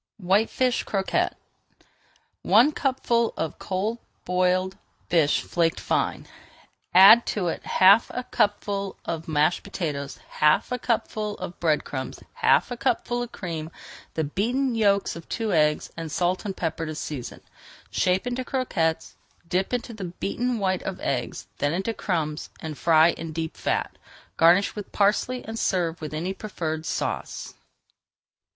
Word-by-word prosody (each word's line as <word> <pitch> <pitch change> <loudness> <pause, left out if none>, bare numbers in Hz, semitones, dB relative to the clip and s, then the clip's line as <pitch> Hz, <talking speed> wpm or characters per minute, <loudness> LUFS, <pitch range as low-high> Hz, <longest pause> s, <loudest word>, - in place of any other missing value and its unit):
WHITEFISH 220 +6 +2
CROQUETTES 195 -2 0 1.1
One 250 +7 +5
cupful 245 -5 0
of 160 - -3
cold 205 +5 -2 0.3
boiled 185 +1 +1 0.3
fish 160 -4 +3
flaked 165 -1 0
fine. - - -1
[Page - - -21 0.6
449] 190 +2 +10
Add 235 +1 +6
to 190 -5 -1
it - - -5
half 195 +5 +6
a 250 - -4
cupful 200 -3 -1
of 165 -1 -4
mashed 155 +2 +2
potatoes, 150 -8 -4 0.2
half 150 +8 +4
a 250 - -1
cupful 215 -3 -1
of 180 -1 -7
bread 155 -3 +2
crumbs, 130 -2 -5
half - - +3
a 245 - -3
cupful 245 -1 0
of 240 -1 -5
cream, 165 -4 -5 0.5
the 160 - 0
beaten 240 - 0
yolks 200 -3 +2
of 170 -1 -10
two 225 -4 -1
eggs, 150 -2 +2
and 165 -2 -6
salt 180 +4 0
and 195 -2 -4
pepper 165 -1 -2
to 155 - -5
season. 145 -5 -6 0.5
Shape 185 +4 +1
into 250 +1 -2
croquettes, 165 -12 -1 0.3
dip 185 +3 0
into 245 -1 -2
the 205 -4 -6
beaten 230 +7 -2
white 190 -3 0
of 195 - -5
eggs, 125 -3 -3
then 145 +2 +1
into 195 +5 -1
crumbs, 160 -8 -2
and 155 -1 -6
fry 160 +2 +5
in 165 -1 -7
deep 160 0 -4
fat. - - -1 0.4
Garnish 175 +4 +5
with 210 -2 -7
parsley 215 +5 +1
and 225 +1 -5
serve 170 -3 0
with 155 - -5
any 170 +5 -3
preferred 160 -7 -4
sauce. - - -3
185 Hz, 150 wpm, -25 LUFS, 160-220 Hz, 1.1 s, 449